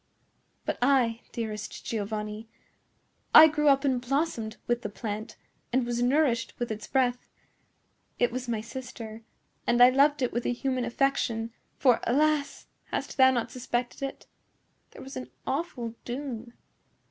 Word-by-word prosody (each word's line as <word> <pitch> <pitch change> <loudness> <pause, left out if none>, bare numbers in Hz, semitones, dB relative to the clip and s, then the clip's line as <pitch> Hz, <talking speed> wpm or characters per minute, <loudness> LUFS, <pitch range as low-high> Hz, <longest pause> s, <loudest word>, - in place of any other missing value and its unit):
But - - -2
I, 245 -3 +3
dearest 215 -3 -5
Giovanni,—I 215 +7 +1
grew 300 -1 0
up 275 0 +5
and 260 -3 +1
blossomed 245 -4 -1
with 240 0 0
the - - -4
plant 215 0 -5 0.3
and 255 0 +2
was 240 0 -1
nourished 245 -3 +2
with 240 -1 -3
its 215 0 -5
breath. 250 -2 0 0.9
It 245 - +2
was 255 +1 -4
my 225 -2 -1
sister, 230 -2 -8 0.5
and 240 - +3
I 245 +1 +9
loved 280 +1 +4
it 250 - 0
with 240 +1 -1
a - - +1
human 255 0 -1
affection; 235 -2 0 0.3
for, 250 -4 +4
alas!—hast 295 +3 -1
thou 260 -1 +8
not 240 -3 -1
suspected 245 0 -3
it?—there 275 0 -11
was 270 - -9
an 125 0 -6 0.2
awful 265 -6 -3
doom." 240 -2 -5
245 Hz, 135 wpm, -28 LUFS, 230-270 Hz, 0.9 s, I